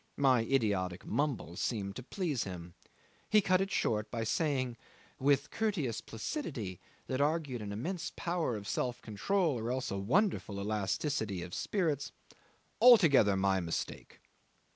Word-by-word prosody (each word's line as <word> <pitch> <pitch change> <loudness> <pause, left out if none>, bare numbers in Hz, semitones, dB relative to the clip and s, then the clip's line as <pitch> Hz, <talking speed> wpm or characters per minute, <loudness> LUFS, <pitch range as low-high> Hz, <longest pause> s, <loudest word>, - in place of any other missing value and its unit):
My 130 -4 +4
idiotic 100 -9 0
mumble 135 - -1
seemed 100 -4 -2
to - - -5
please 150 - -2
him. 90 -2 -7 0.6
He 215 - +6
cut 185 -2 +3
it 195 - -1
short 110 - 0
by 115 -2 -2
saying, 130 -1 0 0.4
with 140 +1 +2
courteous 185 - -1
placidity 110 - -5 0.3
that 130 +1 -1
argued 145 -5 0
an 105 -1 -5
immense 170 - -3
power 170 -8 -1
of 105 -1 -6
self 125 -1 -1
control 150 - 0
or 115 +1 -3
else 130 +1 -2
a 100 - -2
wonderful 125 - +1
elasticity 105 - -1
of 90 0 -9
spirits 155 -8 -1 0.7
"Altogether 155 - +7
my 95 0 +2
mistake." 85 -2 -4
125 Hz, 140 wpm, -32 LUFS, 100-160 Hz, 0.7 s, Altogether